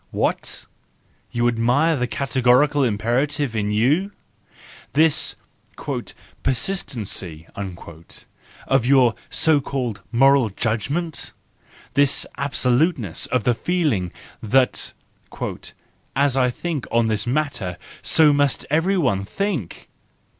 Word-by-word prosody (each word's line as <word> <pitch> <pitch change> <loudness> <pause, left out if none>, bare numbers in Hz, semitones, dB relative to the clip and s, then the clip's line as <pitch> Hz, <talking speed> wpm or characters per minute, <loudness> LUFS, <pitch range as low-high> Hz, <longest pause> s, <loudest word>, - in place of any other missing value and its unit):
— - - -41
What? - - -2 0.6
You 120 -1 0
admire 125 +8 +2
the 125 -3 -1
categorical 135 +2 +2
imperative 125 +4 0
in 105 -1 0
you? 145 - +2 0.8
This 155 0 +3 0.6
" - - -8
persistency 115 - -3
" - - -35 1.1
of 135 -3 +2
your 130 -4 +5 0.2
so 155 -3 +3
called 125 -7 -3
moral 135 0 +4
judgment? 135 - -2 0.6
This 140 -1 +3
absoluteness 130 - 0
of 125 -3 0
the 120 - +3
feeling 120 - 0 0.3
that 125 +4 +1 0.6
" - - -15
as 135 -2 +1
I 130 -1 +3
think 150 +1 -4
on 115 0 +3
this 110 0 -1
matter, 120 -10 -2 0.2
so 155 -2 +5
must 145 -2 +1
everyone 155 - +2
think"? 165 - -4
130 Hz, 105 wpm, -22 LUFS, 115-145 Hz, 1.1 s, your